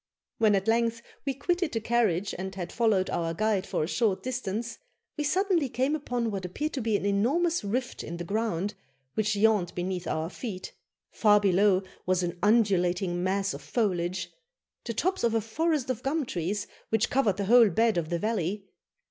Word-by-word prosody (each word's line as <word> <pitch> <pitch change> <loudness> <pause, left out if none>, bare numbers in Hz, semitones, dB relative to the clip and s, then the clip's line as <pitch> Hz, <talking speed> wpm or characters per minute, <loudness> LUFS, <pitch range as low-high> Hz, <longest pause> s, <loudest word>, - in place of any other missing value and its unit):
When 215 -2 +5
at 195 +1 -1
length 230 0 +1 0.2
we 270 - 0
quitted 350 +3 -1
the 225 - 0
carriage 210 -5 +1
and 190 +1 -5
had 180 -2 -5
followed 220 -5 +2
our 165 -1 -1
guide 210 -1 0
for - - -1
a - - -2
short 205 0 0
distance, 235 -2 -3 0.4
we 300 - -2
suddenly 345 -1 +1
came 260 +5 0
upon 245 -6 -2
what 195 -2 -4
appeared 295 - -3
to 270 - -2
be 220 -2 +1
an 200 - -5
enormous 275 +12 +1
rift 245 +5 -2
in 170 - -6
the 175 - -4
ground, 205 0 -1 0.4
which 215 -1 0
yawned 205 -4 +2
beneath 180 0 -3
our 160 +2 -2
feet. 195 -6 -6 0.4
Far 210 -2 +5
below 195 0 +3 0.2
was 185 -1 +2
an 175 0 -3
undulating 185 -5 +2
mass 195 +1 0
of - - -7
foliage 185 -5 -1 0.5
the 230 - -4
tops 370 - 0
of 230 -1 +2
a - - +4
forest 285 +4 0
of 250 -2 -4
gum 285 +2 0
trees, 200 +1 -2 0.2
which 220 0 +1
covered 225 -8 +2
the 200 - -1
whole 230 +1 +7
bed 225 +5 +2
of 165 -3 -1
the 170 - 0
valley. 200 0 -2
210 Hz, 185 wpm, -28 LUFS, 185-240 Hz, 0.5 s, whole